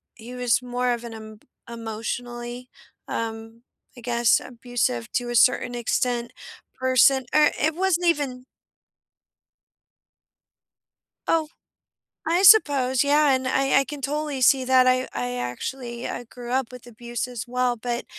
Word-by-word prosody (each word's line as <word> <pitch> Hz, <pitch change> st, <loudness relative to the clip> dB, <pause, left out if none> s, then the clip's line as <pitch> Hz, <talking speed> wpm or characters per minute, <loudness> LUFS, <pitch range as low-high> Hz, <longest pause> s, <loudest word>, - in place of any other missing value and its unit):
he 245 Hz, +2 st, -10 dB
was 245 Hz, 0 st, +1 dB
more 250 Hz, 0 st, -1 dB
of 235 Hz, 0 st, -5 dB
an 235 Hz, -1 st, -8 dB
em 215 Hz, -1 st, -11 dB, 0.3 s
emotionally, 240 Hz, +2 st, -6 dB, 0.4 s
um, 225 Hz, 0 st, -6 dB, 0.3 s
I -, -, -11 dB
guess, 235 Hz, -1 st, +2 dB
abusive- 235 Hz, -, -3 dB
to 245 Hz, -1 st, -1 dB
a 240 Hz, -, -3 dB
certain 245 Hz, +1 st, +3 dB
extent- 240 Hz, 0 st, -1 dB, 0.5 s
person, 260 Hz, +1 st, +4 dB
or 300 Hz, 0 st, +5 dB
it 310 Hz, +1 st, +1 dB
wasn't 360 Hz, -1 st, +1 dB
even 270 Hz, -6 st, -1 dB, 2.8 s
Oh! 320 Hz, -2 st, +1 dB, 0.8 s
I 345 Hz, +3 st, +2 dB
suppose 280 Hz, -, +5 dB
yeah 290 Hz, -1 st, +3 dB
And 260 Hz, 0 st, -2 dB
I 270 Hz, +1 st, +2 dB
I 275 Hz, -, -1 dB
can 290 Hz, -1 st, -8 dB
totally 295 Hz, 0 st, -3 dB
see 260 Hz, +1 st, +5 dB
that, 255 Hz, 0 st, +5 dB
I 255 Hz, 0 st, +2 dB
I 125 Hz, 0 st, -3 dB
actually 235 Hz, -, -5 dB
I 245 Hz, -, -5 dB
grew 240 Hz, +1 st, -10 dB
up 265 Hz, -1 st, +1 dB
with 250 Hz, -1 st, -12 dB
abuse 240 Hz, +1 st, -5 dB
as 245 Hz, -3 st, -6 dB
well, 250 Hz, 0 st, 0 dB
but 240 Hz, +1 st, -4 dB
250 Hz, 140 wpm, -24 LUFS, 235-265 Hz, 2.8 s, or